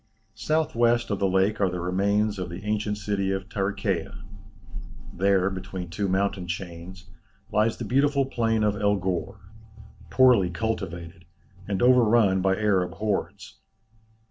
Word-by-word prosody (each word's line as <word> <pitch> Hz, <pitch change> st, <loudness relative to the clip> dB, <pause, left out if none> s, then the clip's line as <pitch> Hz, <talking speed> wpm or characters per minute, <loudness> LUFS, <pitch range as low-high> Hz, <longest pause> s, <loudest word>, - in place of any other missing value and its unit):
South 155 Hz, +8 st, -1 dB
west 120 Hz, -1 st, +2 dB
of 100 Hz, -, -1 dB
the 100 Hz, -, +2 dB
lake 95 Hz, +3 st, +1 dB
are 95 Hz, -, +3 dB
the 90 Hz, 0 st, -4 dB
remains 100 Hz, +4 st, 0 dB
of 90 Hz, -, -4 dB
the 85 Hz, +3 st, -8 dB
ancient 105 Hz, 0 st, -1 dB
city 100 Hz, -1 st, -2 dB
of 95 Hz, -1 st, -3 dB
Tarichæa. 100 Hz, 0 st, -3 dB, 0.9 s
There, 95 Hz, 0 st, +2 dB
between 95 Hz, -2 st, -6 dB
two 100 Hz, +3 st, -2 dB
mountain 95 Hz, -1 st, -1 dB
chains, 90 Hz, +1 st, -7 dB, 0.4 s
lies 110 Hz, +1 st, +1 dB
the -, -, -5 dB
beautiful 140 Hz, +1 st, +2 dB
plain 115 Hz, -4 st, 0 dB
of 105 Hz, -1 st, +1 dB
El 100 Hz, 0 st, +1 dB
Ghor, 95 Hz, -2 st, -3 dB, 0.7 s
poorly 125 Hz, -8 st, +4 dB
cultivated, 85 Hz, -3 st, -5 dB, 0.4 s
and 100 Hz, 0 st, -1 dB
overrun 115 Hz, -6 st, +4 dB
by 95 Hz, 0 st, +2 dB
Arab 95 Hz, -4 st, +1 dB
hordes. 100 Hz, -2 st, -4 dB
100 Hz, 140 wpm, -25 LUFS, 95-110 Hz, 0.9 s, poorly